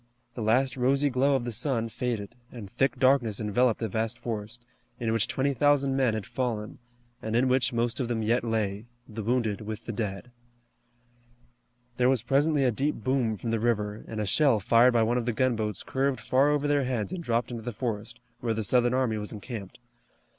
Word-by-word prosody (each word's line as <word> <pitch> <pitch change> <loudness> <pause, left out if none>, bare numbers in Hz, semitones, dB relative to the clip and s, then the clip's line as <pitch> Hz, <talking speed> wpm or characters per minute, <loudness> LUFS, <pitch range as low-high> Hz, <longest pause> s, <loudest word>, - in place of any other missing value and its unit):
The 120 - -6
last 125 +5 +2
rosy 135 +3 +2
glow 135 +3 +2
of 125 -3 -1
the 120 - -3
sun 115 0 0
faded, 115 -3 -4 0.2
and 115 -5 -8
thick 135 +3 0
darkness 130 -6 +3
enveloped 115 +2 +1
the 115 - -1
vast 110 +3 -2
forest, 115 0 -6 0.3
in 115 -2 -1
which 115 -2 +2
twenty 140 +1 0
thousand 140 0 +2
men 130 -5 +2
had 110 - -4
fallen, 115 -5 -3 0.4
and 110 0 -3
in 125 +2 +3
which 130 +1 +2
most 120 +1 -1
of 125 - -1
them 115 -2 -1
yet 115 +3 +1
lay, 110 -2 -2 0.2
the 110 0 -6
wounded 110 -2 0
with 110 +1 -6
the - - -4
dead. 105 0 -4 1.7
There 125 0 +3
was 130 -4 +2
presently 140 +3 +2
a 125 - +3
deep 140 +7 -1
boom 115 -2 0
from 115 +3 -4
the 115 - 0
river, 105 -2 -1
and 110 - -5
a 105 - -1
shell 135 +1 +3
fired 115 +5 +4
by 115 -1 +4
one 120 +3 +1
of 120 - -5
the 120 - +1
gunboats 110 -5 0
curved 135 -1 -1
far 130 +6 +2
over 150 0 +1
their 145 -2 +2
heads 125 - -2
and 180 -2 -5
dropped 120 -2 -1
into 120 -1 -5
the 120 +2 -4
forest, 115 +1 -4 0.2
where 115 -2 -1
the 110 - -2
Southern 120 +3 +3
army 125 -4 +1
was 105 - -6
encamped. 105 -2 -8
120 Hz, 205 wpm, -27 LUFS, 110-130 Hz, 1.7 s, fired